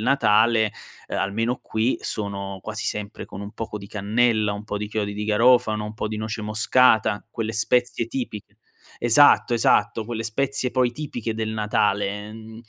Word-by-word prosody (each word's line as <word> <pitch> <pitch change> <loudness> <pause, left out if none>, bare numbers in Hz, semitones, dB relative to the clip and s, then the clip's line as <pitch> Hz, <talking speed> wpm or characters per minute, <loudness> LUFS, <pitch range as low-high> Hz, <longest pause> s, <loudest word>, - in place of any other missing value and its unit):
Natale, 110 -3 +3 0.4
uhm, - - -3
almeno 115 +5 -1
qui 110 +4 0
sono 100 -2 -4
quasi 110 0 -5
sempre 105 +1 -5
con 95 - -8
un 100 +1 -8
poco 110 -2 -6
di 100 -1 -8
cannella, 110 +1 +1
un 105 +1 -7
po' 105 -1 -4
di 105 - -4
chiodi 105 -1 -2
di 105 +1 -4
garofano, 110 0 +3
un 105 - -6
po' 110 - -3
di 110 - -4
noce 110 0 -4
moscata, 110 0 +3
quelle 110 -1 -3
spezie 115 +1 +1
tipi 115 -5 -4 0.6
esatto, 120 +2 +5
esatto, 110 -1 +2
quelle 115 -1 -3
spezie 130 +3 -1
poi 125 -2 +1
tipiche 120 -6 -4
del 110 -1 -2
Natale; 105 -1 0
uhm, 110 +1 -11
110 Hz, 165 wpm, -23 LUFS, 105-115 Hz, 0.6 s, esatto